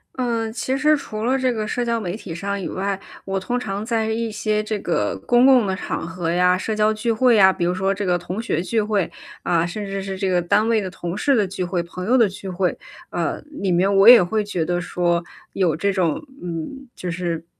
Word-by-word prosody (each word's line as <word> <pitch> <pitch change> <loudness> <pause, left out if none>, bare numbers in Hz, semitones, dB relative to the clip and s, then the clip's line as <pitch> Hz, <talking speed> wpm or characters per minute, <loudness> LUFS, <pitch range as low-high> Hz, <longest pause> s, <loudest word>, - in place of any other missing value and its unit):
呃， 230 -3 -1
其 260 +3 -2
实 300 +2 +3
除 215 -6 -6
了 260 +3 +2
这 255 -2 +1
个 215 -1 -3
社 245 +1 -1
交 230 -1 0
媒 185 -2 -4
体 195 -6 -8
上 200 +3 -3
以 - - -4
外， 195 +1 -2 0.3
我 195 0 -1
通 245 +6 -2
常 205 -2 -4
在 225 -2 0
一 225 +1 -1
些 215 0 0
这 215 0 -2
个 105 - -1
公 245 +1 +5
共 255 -5 +6
的 190 - 0
场 - - -4
合 165 0 -4
呀、 180 +1 +3
社 215 +3 -3
交 215 0 +3
聚 225 +2 -1
会 230 0 +4
啊， 190 -1 +7
比 175 - -3
如 175 +1 +1
说 190 +1 0
这 200 +1 -3
个 180 -1 +2
同 185 +5 -5
学 170 -8 -1
聚 215 +5 0
会， 205 -3 0 0.3
啊， 170 -1 +2
甚 205 +4 -5
至 195 0 -4
是 190 0 -5
这 190 0 -1
个 180 -1 +2
单 205 +5 +2
位 225 -2 +2
的 190 - -4
同 175 -1 -5
事 275 +3 +2
的 210 -3 +2
聚 185 0 -4
会、 175 0 -1
朋 180 +1 -7
友 250 +5 +3
的 230 -4 +5
聚 190 0 -8
会， 180 0 0 0.4
呃， - - -2
里 195 -10 -2
面 190 +3 +2
我 195 +4 +8
也 245 -5 +10
会 210 +4 0
觉 180 -6 -2
得 175 +1 -1
说， 175 -1 0 0.3
有 180 -5 +1
这 200 +5 0
种 175 -5 0 0.2
嗯， 180 +11 -6
就 180 - -5
是 170 -1 -3
195 Hz, 260 characters per minute, -22 LUFS, 180-225 Hz, 0.4 s, 也